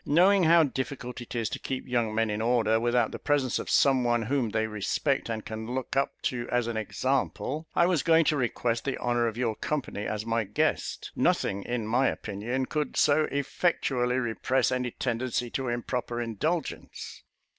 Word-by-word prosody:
Knowing 180 +4 +4
how 165 0 +6
difficult 130 -3 -4
it 120 - -8
is 115 -2 0
to - - -4
keep 130 -1 -4
young 120 -3 0
men 115 -1 +1
in 105 +1 -2
order, 115 -1 +2
without 120 -1 +2
the - - -6
presence 140 -4 +1
of - - -5
some 135 -2 +4
one 120 -1 +2
whom 125 0 0
they 110 +1 0
respect, 110 +6 -1
and 110 -2 -3
can 110 +3 -5
look 130 0 -3
up 135 0 0
to 120 -1 -2
as 120 -1 +1
an 120 0 -3
example, 135 +7 -1
I 170 - +5
was 175 -5 +2
going 165 -1 +4
to 155 - +3
request 120 -3 -1
the 135 - -2
honour 120 -1 +1
of 115 0 -4
your 115 -3 0
company 135 -8 -3
as 105 0 -3
my 115 0 +1
guest. 105 +1 -1
Nothing, 100 - +1
in 120 -2 -2
my 125 +5 +2
opinion, 115 +6 -2
could 150 0 -2
so 150 +1 +4
effectually 135 -3 0
repress 130 +2 +1
any 125 -1 0
tendency 120 0 -2
to 135 -1 -2
improper 120 0 -2
indulgence." 120 - -3
125 Hz, 185 wpm, -28 LUFS, 115-135 Hz, -, how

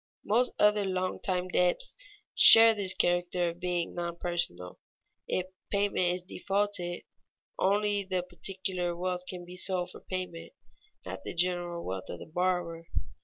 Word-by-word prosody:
Most 240 +4 +2
other 210 0 +4
long 185 -1 -2
time 185 -2 -1
debts 180 - +1 0.4
share 225 0 +9
this 195 -3 0
character 175 0 +1
of 170 +1 -9
being 175 -1 -2
non 170 -1 -4
personal; 170 - -3 0.5
if 185 - -1 0.2
payment 200 -3 +1
is 180 - -7
defaulted, 195 -1 -2 0.6
only 205 +1 +2
the 185 -2 -2
particular 185 -1 -2
wealth 180 0 -3
can 180 -1 -6
be 180 +1 -10
sold 180 -1 +2
for - - -11
payment, 185 -3 -6 0.5
not 95 +1 -7
the - - -6
general 175 -1 -1
wealth 95 0 -5
of - - -5
the - - -9
borrower. 170 -1 -1
180 Hz, 145 wpm, -30 LUFS, 175-190 Hz, 0.6 s, share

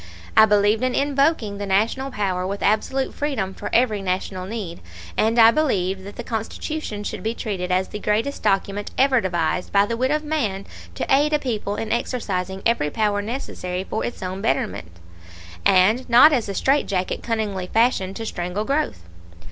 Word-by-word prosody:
I 220 - +8
believed 210 +1 +3
in 255 0 0
invoking 275 -7 +1
the 205 - -4
National 225 +8 +1
power 190 -6 -2
with 200 +1 -4
absolute 265 +6 +1
freedom 255 -10 -2
for - - -6
every 230 -4 +2
National 185 0 -3
need; 200 -6 -5 0.4
and 225 +2 +1
I 225 0 +8
believed 195 -11 0
that 200 - -9
the 240 - -6
Constitution 225 +1 -4
should - - -5
be 225 +2 -2
treated 185 -6 -3
as 185 +1 +1
the 210 - -6
greatest 220 +7 -1
document 200 +1 0
ever 265 -2 +4
devised 175 -1 -1
by 200 0 +4
the 230 - -2
wit 255 +3 0
of 305 +1 0
man 225 -11 -2 0.3
to - - -2
aid 290 +3 +3
a - - +5
people 220 -7 -3
in 220 0 -4
exercising 190 -6 -2
every 230 -11 +2
power 205 +2 0
necessary 195 -6 -4
for 215 +3 -3
its 240 - -5
own 185 +1 -4
betterment, 220 - -1 0.8
and 210 +8 +3
not 250 +6 +8
as 235 -6 0
a 200 - -4
straitjacket 200 -10 0
cunningly 210 -5 -2
fashioned 205 -4 +1
to 225 - -5
strangle 180 +1 -3
growth. 275 - -1
210 Hz, 175 wpm, -22 LUFS, 190-250 Hz, 0.8 s, I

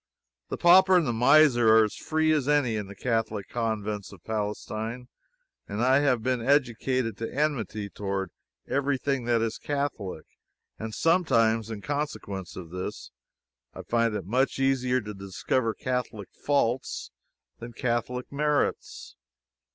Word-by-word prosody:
The - - -3
pauper 185 +2 +6
and 170 - +2
the 120 - 0
miser 125 -1 +5
are 110 - +7
as 105 - -2
free 155 0 0
as 150 -4 +1
any 145 -6 +2
in 105 -2 -3
the 100 - -10
Catholic 110 -3 -2
Convents 110 -3 -3
of 95 -4 -14
Palestine. 110 +3 -4 0.6
I 125 +6 +3
have 130 -6 +1
been 125 -1 0
educated 130 -2 +1
to 115 - -4
enmity 125 -8 -1
toward 100 -2 -4 0.4
every 140 0 0
thing 135 -2 -1
that 120 -1 +2
is 115 0 -3
Catholic, 135 - -3 0.5
and 110 0 -5
sometimes, 115 - +2
in 110 -2 -6
consequence 120 - -4
of 85 -3 -9
this, 90 -7 -6 0.6
I - - -7
find 115 -2 +1
it 100 -5 -4
much 130 +7 +1
easier 130 -1 +1
to 105 0 -7
discover 100 +4 -2
Catholic 125 -6 -3
faults 135 -3 -1 0.5
than 115 0 -8
Catholic 125 +1 -2
merits. 150 0 -1
120 Hz, 140 wpm, -27 LUFS, 110-140 Hz, 0.6 s, are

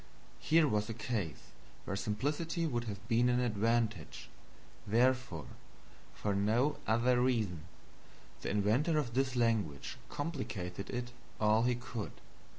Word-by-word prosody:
Here 160 0 +4
was 105 -4 0
a 115 - -3
case 105 - -3 0.3
where 95 - -2
simplicity 145 - -1
would 120 -6 -1
have 105 -1 -6
been 120 +1 +3
an 125 0 +3
advantage; 115 -5 0 0.6
therefore, 120 - +2 0.7
for 105 - -1
no 110 +9 +2
other 120 +2 +3
reason, 110 -10 0 0.8
the - - -3
inventor 115 - +2
of 130 -6 -1
this 130 0 +1
language 110 - 0
complicated 105 - -4
it 125 0 -3 0.3
all 110 +1 +4
he 125 0 +3
could. 120 -3 -5
115 Hz, 125 wpm, -34 LUFS, 105-130 Hz, 0.8 s, Here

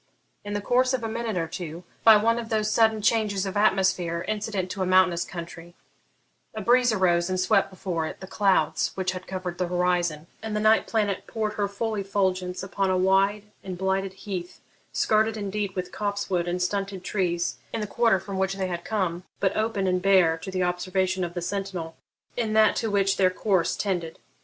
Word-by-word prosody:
In 205 0 -5
the 205 - -1
course 255 +4 +2
of 245 - -5
a - - -1
minute 225 -2 -3
or 165 -1 -1
two, 170 +1 -7 0.2
by 220 -1 +9
one 230 +3 +2
of 230 -1 -6
those 215 -1 0
sudden 220 -1 +3
changes 210 -3 +1
of 195 - -4
atmosphere 185 -4 +1
incident 205 -3 -2
to 195 - -4
a - - +2
mountainous 185 -2 +4
country, 170 0 -9 0.8
a 215 - -3
breeze 245 +3 +4
arose 175 -4 +2
and 185 0 -1
swept 185 +1 +3
before 180 -4 -3
it - - -8
the 190 - -8
clouds 195 0 +1
which 185 -1 -1
had 185 0 -8
covered 185 -2 -5
the 180 - 0
horizon, 175 -3 0 0.2
and 220 -1 -4
the - - +1
night 215 +1 +4
planet 205 -4 -1
poured 215 -2 -2
her 205 -1 -1
full 220 +3 -3
effulgence 190 -2 -1
upon 195 0 -1
a 185 - +2
wide 195 +2 +3 0.2
and 185 -2 -6
blighted 190 +1 -1
heath, 190 -2 -6 0.3
skirted 220 +1 +2
indeed 200 -1 -3
with 180 -1 -4
copse 205 -1 -3
wood 175 -1 +1
and 180 +1 -1
stunted 195 0 -2
trees 175 -3 -1
in - - -3
the 210 - -2
quarter 230 -2 +2
from 190 +1 -5
which 190 0 0
they 195 -1 -2
had 175 -2 -4
come, 185 -5 -2 0.2
but 190 -1 +1
open 215 -3 0
and 180 -1 +1
bare 185 -4 +4
to 165 +4 -8
the 185 -1 -1
observation 185 +1 0
of 175 0 -4
the 175 - -3
sentinel 185 -4 -4 0.4
in 225 -3 -1
that 220 0 +5
to 225 - -1
which 195 -1 +2
their 185 -2 +4
course 185 -2 +1
tended. 175 -5 -2
190 Hz, 200 wpm, -26 LUFS, 180-210 Hz, 0.8 s, by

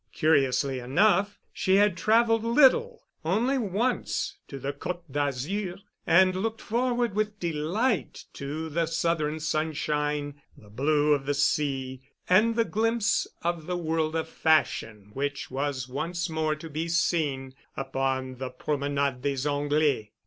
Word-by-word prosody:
Curiously 135 -3 +2
enough, 200 +10 +2 0.2
she 190 - +2
had 205 -2 +4
traveled 225 +5 +3
little—only 260 - +2
once 225 +3 -1
to 140 - -7
the 135 +2 -4
Côte 175 +5 -5
d'Azur, 145 +8 -2 0.3
and 185 +2 +5
looked 220 +4 -2
forward 240 -1 0
with 210 0 -1
delight 170 +9 -1
to 150 +3 -5
the 165 +2 0
southern 165 -2 0
sunshine, 150 -2 -2 0.2
the 105 -1 -17
blue 145 +5 +2
of 140 -1 -2
the 145 - +1
sea, 135 -2 0 0.3
and 220 +5 +4
the 230 -1 +2
glimpse 225 0 +1 0.2
of 170 -2 -2
the 180 0 -1
world 160 -1 -1
of 160 0 -1
fashion 115 -11 0
which 145 +1 -3
was 135 -1 -2
once 165 +6 -3
more 155 -1 0
to 155 +2 -9
be 160 +2 -3
seen 150 -6 0 0.2
upon 135 -1 -2
the 130 0 -4
Promenade 140 0 -1
des 140 0 -1
Anglais. 145 -6 0
155 Hz, 135 wpm, -27 LUFS, 140-190 Hz, 0.3 s, and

